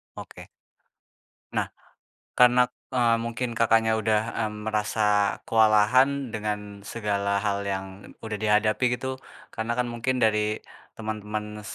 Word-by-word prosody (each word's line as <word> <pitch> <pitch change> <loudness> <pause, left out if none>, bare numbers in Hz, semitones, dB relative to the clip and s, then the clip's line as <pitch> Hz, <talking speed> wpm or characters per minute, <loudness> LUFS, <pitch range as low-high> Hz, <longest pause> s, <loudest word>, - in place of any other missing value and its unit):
Oke. - - -10 1.1
Nah - - +1 0.7
karena, 125 0 +6 0.4
eee, 120 -2 +4
mungkin 115 +1 -3
Kakaknya 115 -1 +3
udah, 110 0 +2 0.3
mmm, 105 - -9
merasa 110 0 -1 0.4
kewalahan 110 +4 +5 0.2
dengan 105 -1 -4
segala 100 -3 -1
hal 100 -1 0
yang 95 -1 -2 0.4
udah 110 -1 -3
dihadapi 110 +3 +2
gitu, 130 +1 -4 0.4
karena 110 +1 -3
kan 125 - +1
mungkin 120 +2 -1
dari 105 -1 +1 0.4
temen-temen 105 -1 -5
110 Hz, 110 wpm, -26 LUFS, 105-115 Hz, 1.1 s, karena